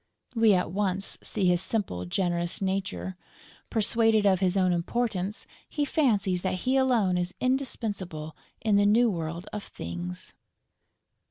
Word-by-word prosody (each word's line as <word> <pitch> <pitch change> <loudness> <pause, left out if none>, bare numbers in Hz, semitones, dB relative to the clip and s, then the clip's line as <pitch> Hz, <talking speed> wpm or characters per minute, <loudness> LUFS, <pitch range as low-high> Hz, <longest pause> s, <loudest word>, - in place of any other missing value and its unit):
We 225 -4 +5
at 180 -2 0
once 195 0 -1
see 200 -3 -1
his 175 -1 +3
simple, 190 - -2
generous 175 - -1
nature. 190 -1 -2 0.5
Persuaded 225 -1 +3
of 190 -2 +4
his 190 0 +1
own 185 -2 +3
importance, 205 +2 -1 0.2
he 295 -2 -1
fancies 205 - +1
that 185 -1 -2
he 260 +1 +2
alone 235 -9 +3
is 180 +1 -3
indispensable 205 - -2 0.3
in 215 -2 +3
the 205 0 +4
new 230 +2 +4
world 170 +1 -4
of 210 - -3
Things. 85 - -7
195 Hz, 140 wpm, -27 LUFS, 180-225 Hz, 0.5 s, We